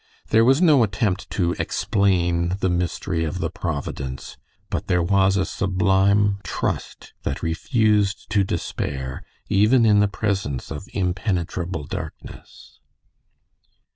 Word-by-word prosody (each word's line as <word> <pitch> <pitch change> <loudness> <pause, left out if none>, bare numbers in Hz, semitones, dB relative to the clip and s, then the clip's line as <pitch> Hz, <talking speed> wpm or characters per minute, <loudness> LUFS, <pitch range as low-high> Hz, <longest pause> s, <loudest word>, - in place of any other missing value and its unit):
There 110 +1 +5
was 135 +8 +4
no 150 -7 +6
attempt 105 -2 0
to 85 -3 0
explain 90 -3 +1
the 95 -2 +1
"mystery 90 -1 -1
of 80 +3 -3
the - - -2
Providence," 70 -5 -5 0.4
but - - -3
there 90 -1 +2
was 95 +1 +3
a 95 - +1
sublime 100 +2 +2
trust - - -4
that - - -4
refused 105 +4 +1
to 100 -2 +3
despair 65 -7 -4 0.3
even 115 +5 +4
in 105 -2 +5
the 105 - +4
presence 95 - -2
of 75 - -6
impenetrable 90 -3 -2
darkness. - - -9
95 Hz, 120 wpm, -23 LUFS, 85-105 Hz, 0.4 s, no